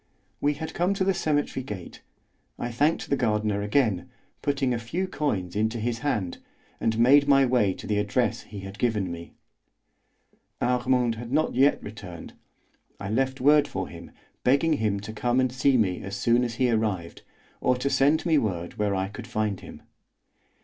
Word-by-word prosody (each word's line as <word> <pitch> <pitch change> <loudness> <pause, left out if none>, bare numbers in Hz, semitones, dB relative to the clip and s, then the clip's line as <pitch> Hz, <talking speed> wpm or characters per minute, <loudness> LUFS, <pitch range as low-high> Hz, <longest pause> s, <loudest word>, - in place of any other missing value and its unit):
We 145 +1 +1
had 160 +2 -6
come 180 +3 +1
to 195 - 0
the 195 +1 +2
cemetery 145 -5 -1
gate. 100 -8 -8 0.6
I 120 - -3
thanked 145 +7 +1
the - - +5
gardener 105 -4 0
again, 105 -3 +1 0.3
putting 135 -3 0
a 120 - -1
few 165 +12 -3
coins 100 - -2
into 110 +3 0
his 115 +1 -2
hand, 105 -12 -2 0.4
and 110 -1 0
made 140 +5 +6
my 135 -1 +6
way 120 -7 +2
to - - -10
the 105 -1 0
address 105 +2 0
he 100 -1 -9
had 95 +1 -9
given 105 -6 0
me. 85 0 -9 1.2
Armand 125 -1 +2
had 120 0 -8
not 155 +3 +1
yet 135 +3 +3
returned. 100 -5 -9 0.7
I 100 +1 -4
left 130 +3 0
word 150 +2 +5
for 95 -1 -4
him, 85 0 -10 0.3
begging 140 +5 +3
him 105 -2 0
to 105 +2 -7
come 120 +3 +1
and 130 -1 +2
see 130 +1 +3
me 95 -6 +1
as 100 +1 -5
soon 120 +4 +2
as 120 -2 -3
he 125 0 +2
arrived, 105 -7 -1 0.4
or 125 - +2
to 125 - -2
send 145 +4 +3
me 160 -3 +4
word 90 -6 -3
where 105 -2 +1
I 95 0 -1
could 110 +4 -9
find 110 -4 -1
him. - - -12
120 Hz, 180 wpm, -26 LUFS, 105-135 Hz, 1.2 s, made